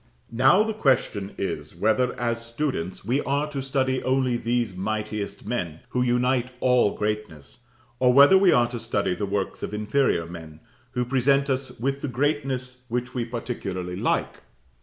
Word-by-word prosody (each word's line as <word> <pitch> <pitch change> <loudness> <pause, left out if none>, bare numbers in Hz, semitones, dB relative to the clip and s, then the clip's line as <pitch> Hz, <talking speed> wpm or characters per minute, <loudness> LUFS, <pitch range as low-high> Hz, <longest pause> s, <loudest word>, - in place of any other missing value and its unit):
Now 135 - +5
the 220 0 -2
question 130 - 0
is, 75 -5 -4
whether, 110 +7 +1
as 115 -1 -1
students, 115 - -3
we 130 +6 +1
are 140 +2 0
to 140 - -3
study 130 -1 0
only 130 -1 +1
these 120 -4 -1
mightiest 105 +1 -4
men, 85 -10 -3
who 125 - 0
unite 125 0 +1
all 125 -5 +3
greatness, 105 - -4 0.3
or 125 -1 +5
whether 140 +8 +8
we 190 -1 +6
are 120 -1 +4
to 120 -1 -5
study 110 -5 -1
the 100 +2 -3
works 100 0 -2
of 105 - -4
inferior 105 -4 +1
men, 80 -2 -10 0.3
who 125 0 0
present 135 +2 +2
us 130 -2 -3
with 135 +3 -1
the - - -2
greatness 130 -1 -2
which 125 +2 -2
we 120 -2 -2
particularly 100 -7 -4
like? - - -1
120 Hz, 160 wpm, -25 LUFS, 105-130 Hz, 0.3 s, whether